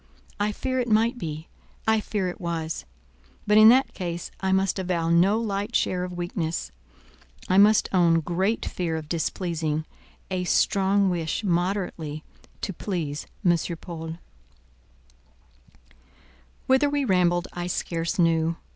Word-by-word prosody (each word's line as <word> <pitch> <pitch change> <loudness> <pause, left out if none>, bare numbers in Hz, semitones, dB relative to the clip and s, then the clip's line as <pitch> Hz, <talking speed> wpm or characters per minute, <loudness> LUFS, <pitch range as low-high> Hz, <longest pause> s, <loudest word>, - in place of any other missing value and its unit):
I 205 +1 +1
fear 260 +4 -2
it 245 - -1
might 230 +3 +2
be; 155 -1 -5 0.4
I 220 0 +4
fear 205 -3 -2
it 180 - -6
was; 165 -2 -3 0.6
but 210 +1 +5
in 215 0 +10
that 260 +3 +4
case 175 -2 -5
I 190 -1 0
must 190 0 +1
avow 175 -3 -1
no 190 +6 +4
light 205 0 -3
share 180 -1 +1
of 180 -1 -6
weakness. 170 - -3 0.8
I 185 +1 +4
must 210 +1 +5
own 170 -3 +4
great 190 +7 -1
fear 170 -3 -2
of 155 -1 -7
displeasing—a 165 +2 -3
strong 195 +1 +2
wish 170 +3 -2
moderately 175 -4 -1 0.4
to 195 - -3
please 165 -6 -4 0.2
M. 175 -1 +5 0.2
Paul. 165 -2 -7 2.5
Whither 265 +2 +3
we 285 -1 0
rambled, 175 -3 +2
I 175 0 -4
scarce 170 +1 -2
knew. 165 -1 +2
180 Hz, 130 wpm, -25 LUFS, 165-205 Hz, 2.5 s, in